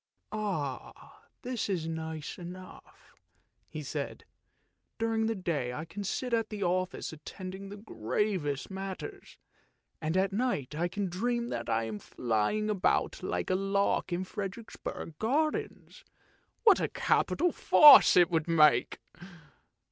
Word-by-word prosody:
" -, -, -16 dB
This 245 Hz, -4 st, -3 dB
is 170 Hz, -5 st, -1 dB
nice 160 Hz, -1 st, -5 dB
enough," 180 Hz, +1 st, -11 dB, 0.6 s
he -, -, -6 dB
said; -, -, -5 dB, 0.3 s
" -, -, -48 dB
during 225 Hz, -1 st, 0 dB
the 225 Hz, -, -1 dB
day 155 Hz, -, -2 dB
I 155 Hz, +5 st, -5 dB
can 200 Hz, +5 st, -7 dB
sit 245 Hz, +5 st, -3 dB
at 225 Hz, -1 st, +1 dB
the 210 Hz, -2 st, -4 dB
office 180 Hz, -1 st, -1 dB
attending 185 Hz, +5 st, -8 dB
to 205 Hz, -, -7 dB
the 205 Hz, -, -14 dB
gravest 145 Hz, -, -2 dB
matters, 195 Hz, -, -7 dB, 0.6 s
and 160 Hz, +3 st, -1 dB
at 195 Hz, +1 st, +1 dB
night 205 Hz, -, -1 dB
I 165 Hz, +3 st, 0 dB
can 200 Hz, +3 st, -3 dB
dream 235 Hz, +6 st, -1 dB
that -, -, -4 dB
I 115 Hz, -, +1 dB
am 110 Hz, -2 st, -5 dB
flying 120 Hz, -, -1 dB
about 205 Hz, -3 st, +1 dB
like -, -, -2 dB
a -, -, +3 dB
lark 195 Hz, 0 st, 0 dB
in 175 Hz, +2 st, -1 dB
Frederiksborg 195 Hz, -5 st, -7 dB
gar 295 Hz, +8 st, +2 dB
dens. -, -, -7 dB, 0.6 s
What 420 Hz, -6 st, +6 dB
a -, -, +1 dB
capital 355 Hz, 0 st, +1 dB
farce 295 Hz, -9 st, +8 dB
it 175 Hz, -1 st, +5 dB
would 160 Hz, -1 st, 0 dB
make 150 Hz, -7 st, +4 dB
190 Hz, 140 wpm, -30 LUFS, 160-220 Hz, 0.6 s, farce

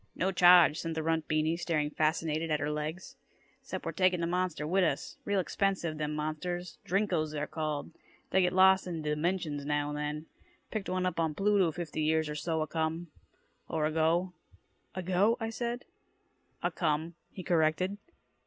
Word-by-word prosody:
"No 185 Hz, +2 st, 0 dB
charge," 175 Hz, -3 st, +7 dB
said 165 Hz, -1 st, -3 dB
the 160 Hz, -, -2 dB
runt 160 Hz, 0 st, 0 dB
Beany, 155 Hz, +1 st, +1 dB
staring 155 Hz, -4 st, -1 dB
fascinated 155 Hz, +1 st, 0 dB
at 150 Hz, -1 st, +1 dB
her 145 Hz, +1 st, -1 dB
legs. 155 Hz, +4 st, -5 dB, 0.4 s
"'Cept -, -, -6 dB
we're -, -, -1 dB
taking 185 Hz, -1 st, +2 dB
da 170 Hz, -, 0 dB
monster 175 Hz, -3 st, -1 dB
wit' 185 Hz, +4 st, +2 dB
us. 155 Hz, -5 st, -1 dB
Real 200 Hz, -1 st, +1 dB
expensive, 185 Hz, -4 st, -1 dB
them 150 Hz, 0 st, -2 dB
monsters. 170 Hz, +4 st, -4 dB
Drinkos, 175 Hz, -5 st, 0 dB
they're 150 Hz, 0 st, -2 dB
called. 155 Hz, -2 st, -3 dB, 0.4 s
Dey 190 Hz, -, +4 dB
get 180 Hz, 0 st, +2 dB
lost 190 Hz, 0 st, +5 dB
in 165 Hz, -3 st, -4 dB
da 150 Hz, -, -1 dB
dimensions 155 Hz, -2 st, -1 dB
now 145 Hz, 0 st, 0 dB
and 150 Hz, -, -4 dB
then. 150 Hz, +1 st, -3 dB, 0.5 s
Picked 215 Hz, -3 st, -3 dB
one 185 Hz, 0 st, 0 dB
up 180 Hz, -, -1 dB
on 160 Hz, -2 st, 0 dB
Pluto 195 Hz, -3 st, +3 dB
fifty 155 Hz, -1 st, -4 dB
years 160 Hz, 0 st, +2 dB
or -, -, -3 dB
so 160 Hz, +1 st, -1 dB
acome 160 Hz, +2 st, -2 dB, 0.6 s
or 155 Hz, -2 st, 0 dB
ago." 165 Hz, +4 st, +1 dB, 0.6 s
"Ago?" 185 Hz, +5 st, +2 dB
I 225 Hz, -1 st, -3 dB
said. 240 Hz, +2 st, -3 dB, 0.8 s
"Acome," 155 Hz, +3 st, 0 dB, 0.2 s
he 185 Hz, -, -8 dB
corrected. 175 Hz, +4 st, +1 dB
165 Hz, 170 wpm, -31 LUFS, 155-185 Hz, 0.8 s, charge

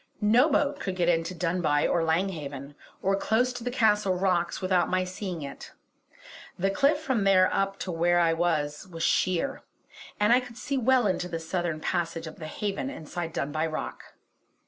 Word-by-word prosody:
No 230 Hz, +8 st, +4 dB
boat 290 Hz, -1 st, +1 dB
could 190 Hz, -6 st, -3 dB
get 175 Hz, -1 st, +1 dB
into 170 Hz, +1 st, 0 dB
Dunbuy 165 Hz, -3 st, +1 dB
or 170 Hz, -, +1 dB
Lang 165 Hz, +4 st, +1 dB
Haven, 140 Hz, -4 st, -7 dB, 0.3 s
or 195 Hz, +1 st, +2 dB
close 230 Hz, +5 st, +1 dB
to 245 Hz, -1 st, -7 dB
the 245 Hz, -, -1 dB
Castle 210 Hz, -6 st, +2 dB
rocks 180 Hz, -2 st, 0 dB
without 185 Hz, -1 st, +1 dB
my 185 Hz, 0 st, +1 dB
seeing 185 Hz, -3 st, -5 dB
it; 140 Hz, -, -9 dB, 0.8 s
the 195 Hz, +2 st, +1 dB
cliff 285 Hz, +8 st, +3 dB
from 260 Hz, -9 st, 0 dB
there 190 Hz, -1 st, +4 dB
up 195 Hz, 0 st, 0 dB
to 185 Hz, -, -3 dB
where 175 Hz, +1 st, +2 dB
I 165 Hz, -1 st, +3 dB
was 160 Hz, -2 st, -1 dB
was 165 Hz, -2 st, -6 dB
sheer, 185 Hz, +10 st, +1 dB, 0.6 s
and 210 Hz, +3 st, +4 dB
I 250 Hz, -, +6 dB
could 245 Hz, -2 st, -10 dB
see 275 Hz, +2 st, -3 dB
well 260 Hz, -1 st, +3 dB
into 185 Hz, -2 st, 0 dB
the 165 Hz, -, -3 dB
southern 165 Hz, -1 st, -2 dB
passage 165 Hz, -1 st, -2 dB
of 160 Hz, -, -9 dB
the 155 Hz, -, -6 dB
Haven 205 Hz, +9 st, -3 dB
inside 165 Hz, -, -5 dB
Dunbuy 155 Hz, +1 st, -1 dB
Rock. 155 Hz, -, -6 dB
185 Hz, 185 wpm, -27 LUFS, 165-210 Hz, 0.8 s, I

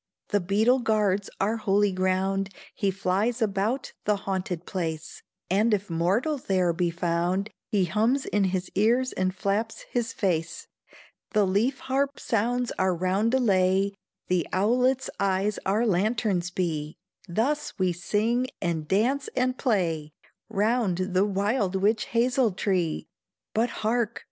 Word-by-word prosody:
The 205 Hz, -, +2 dB
beetle 215 Hz, +8 st, +3 dB
guards 210 Hz, -4 st, +1 dB
our 215 Hz, +4 st, +1 dB
holy 205 Hz, -1 st, +2 dB
ground, 190 Hz, +1 st, 0 dB, 0.2 s
He 200 Hz, -, 0 dB
flies 195 Hz, +5 st, 0 dB
about 220 Hz, +4 st, -1 dB
the 210 Hz, -, +3 dB
haunted 190 Hz, -3 st, -3 dB
place, 165 Hz, -4 st, -4 dB, 0.3 s
And 210 Hz, +4 st, +3 dB
if 200 Hz, -2 st, -6 dB
mortal 200 Hz, -, +1 dB
there 185 Hz, -6 st, +1 dB
be 175 Hz, +1 st, 0 dB
found, 175 Hz, +4 st, -1 dB, 0.2 s
He 200 Hz, -5 st, +2 dB
hums 220 Hz, -, +1 dB
in 205 Hz, -1 st, +1 dB
his 185 Hz, 0 st, -2 dB
ears 240 Hz, +6 st, +2 dB
and 185 Hz, 0 st, 0 dB
flaps 205 Hz, +4 st, -1 dB
his 240 Hz, -2 st, -1 dB
face; 170 Hz, -4 st, -1 dB, 0.7 s
The 210 Hz, -2 st, +4 dB
leaf 215 Hz, +8 st, +1 dB
harp 275 Hz, +1 st, -1 dB
sounds 240 Hz, +2 st, 0 dB
our 185 Hz, -1 st, +2 dB
roundelay, 195 Hz, 0 st, +2 dB, 0.4 s
The 180 Hz, -3 st, +1 dB
owlet's 250 Hz, +7 st, +2 dB
eyes 200 Hz, +1 st, +1 dB
our 210 Hz, +5 st, +2 dB
lanterns 200 Hz, -2 st, +1 dB
be; 160 Hz, -4 st, -2 dB, 0.3 s
Thus 275 Hz, +11 st, -1 dB
we 185 Hz, -2 st, +1 dB
sing, 220 Hz, +8 st, 0 dB
and 160 Hz, -3 st, -2 dB
dance 250 Hz, -, +1 dB
and 255 Hz, 0 st, +1 dB
play, 165 Hz, -, 0 dB, 0.4 s
Round 210 Hz, -2 st, +1 dB, 0.2 s
the 185 Hz, +2 st, +4 dB
wild 200 Hz, 0 st, 0 dB
witch 210 Hz, +3 st, +2 dB
hazel 240 Hz, -1 st, +2 dB
tree. 180 Hz, -4 st, -1 dB, 0.5 s
But 230 Hz, +3 st, +2 dB, 0.2 s
hark! 230 Hz, 0 st, 0 dB
200 Hz, 135 wpm, -26 LUFS, 185-230 Hz, 0.7 s, The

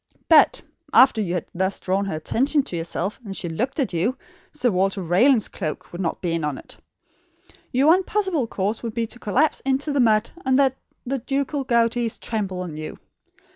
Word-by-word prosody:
But, 320 Hz, -3 st, +5 dB, 0.3 s
after 255 Hz, -4 st, +6 dB
you 180 Hz, -3 st, -2 dB
had 175 Hz, -, -2 dB
thus 190 Hz, +2 st, -1 dB
drawn 195 Hz, +2 st, 0 dB
her 195 Hz, -, -3 dB
attention 270 Hz, -, +1 dB
to 180 Hz, -, -7 dB
yourself 170 Hz, +4 st, -3 dB
and 195 Hz, -3 st, -6 dB
she 175 Hz, -, -4 dB
looked 245 Hz, -, -3 dB
at 260 Hz, -9 st, 0 dB
you, 195 Hz, +10 st, 0 dB, 0.3 s
Sir 255 Hz, -6 st, 0 dB
Walter 195 Hz, +1 st, +1 dB
Raleigh's 215 Hz, +7 st, +4 dB
cloak 155 Hz, -6 st, -6 dB
would 175 Hz, -, -5 dB
not 170 Hz, 0 st, -3 dB
be 175 Hz, -, 0 dB
in 165 Hz, -1 st, -1 dB
it! -, -, -13 dB, 1.0 s
Your 260 Hz, +3 st, +2 dB
one 340 Hz, +5 st, +6 dB
possible 375 Hz, -, 0 dB
course 210 Hz, +1 st, -2 dB
would 230 Hz, -2 st, -5 dB
be 230 Hz, -1 st, 0 dB
to 245 Hz, +2 st, -10 dB
collapse 265 Hz, +9 st, +1 dB
into 275 Hz, +2 st, 0 dB
the 285 Hz, -, +1 dB
mud, 220 Hz, -2 st, +3 dB
and 260 Hz, -1 st, +2 dB
let 270 Hz, -2 st, +3 dB, 0.3 s
the 270 Hz, +2 st, -2 dB
ducal 275 Hz, +3 st, -2 dB
"gouties" 235 Hz, -1 st, +1 dB
trample 195 Hz, -5 st, -3 dB
on 165 Hz, -4 st, -6 dB
you. 155 Hz, 0 st, -6 dB
230 Hz, 190 wpm, -23 LUFS, 190-270 Hz, 1.0 s, after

